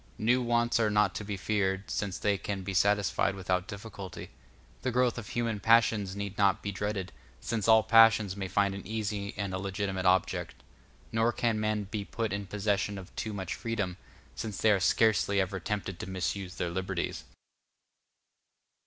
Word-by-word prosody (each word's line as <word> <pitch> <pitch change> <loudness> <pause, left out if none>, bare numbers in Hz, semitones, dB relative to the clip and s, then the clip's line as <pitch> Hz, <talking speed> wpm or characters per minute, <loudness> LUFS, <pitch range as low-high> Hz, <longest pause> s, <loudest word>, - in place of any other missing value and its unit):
New 125 +4 +2
wants 120 -1 +2
are 110 -2 +3
not 105 0 +3
to - - -4
be 100 -1 -4
feared, 95 -1 -1
since 100 -3 -2
they 105 -1 +1
can 95 0 -4
be 95 +1 -4
satisfied 100 +1 +2
without 90 0 -1
difficulty; 100 -3 -8 0.5
the 130 - -1
growth 125 -1 +1
of 110 - -9
human 115 -3 -1
passions 110 -3 +3
need 100 0 -5
not 100 -1 +3
be 100 - -2
dreaded, 100 -1 -3 0.3
since 110 - -2
all 110 -1 +7
passions 110 -3 +6
may 95 -1 -4
find 100 +1 +1
an 100 -1 -8
easy 105 -2 -3
and 100 -2 -3
a 95 - -2
legitimate 95 -1 -2
object; 95 0 +1 0.6
nor 115 +1 +2
can 115 -2 0
men 105 -1 0
be 105 +1 -4
put 110 +1 -3
in 100 -1 -3
possession 100 0 -1
of 95 -2 -11
too 110 - -3
much 95 -2 -4
freedom, 105 -6 -3 0.4
since 105 -4 -5
they 110 - +4
are 100 - +3
scarcely 100 0 +3
ever 95 0 -1
tempted 95 -3 -4
to 110 - -6
misuse 95 0 -3
their 85 - -2
liberties. 95 0 -3
100 Hz, 175 wpm, -30 LUFS, 95-110 Hz, 0.6 s, all